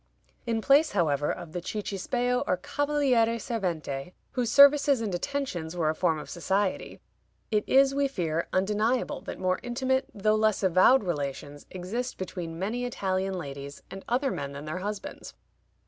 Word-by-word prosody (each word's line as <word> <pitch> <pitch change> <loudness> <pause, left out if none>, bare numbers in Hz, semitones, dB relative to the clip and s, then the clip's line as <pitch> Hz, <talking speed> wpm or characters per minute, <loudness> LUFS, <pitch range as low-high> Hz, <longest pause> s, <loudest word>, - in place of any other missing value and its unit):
In 225 -1 0
place, 280 +4 +4
however, 150 -6 +1
of 170 -3 -7
the 175 - -4
cicisbeo 230 +6 -1
or 180 - +2
cavaliere 255 -1 +1
servente, 180 - -3 0.2
whose 245 -3 -1
services 280 -1 +7
and 215 -4 -3
attentions 175 - -3
were 155 -2 +2
a - - -3
form 165 -1 +1
of 150 - -7
society, 190 +3 -1 0.5
it 210 -1 +2
is, 270 0 +5
we 280 0 +2
fear, 170 - -2
undeniable 210 +6 0
that - - -7
more 185 0 0
intimate 260 +2 -1
though 215 +1 +1
less 215 -2 +2
avowed 190 +8 +5
relations 145 -3 -4
exist 210 +8 -4
between 175 -3 -5
many 215 +7 -2
Italian 190 -5 -1
ladies 140 -3 -7
and 195 0 -8
other 260 +3 +1
men 140 0 -4
than 140 +1 -7
their 155 +4 -4
husbands. 205 +1 -6
195 Hz, 155 wpm, -28 LUFS, 175-245 Hz, 0.5 s, services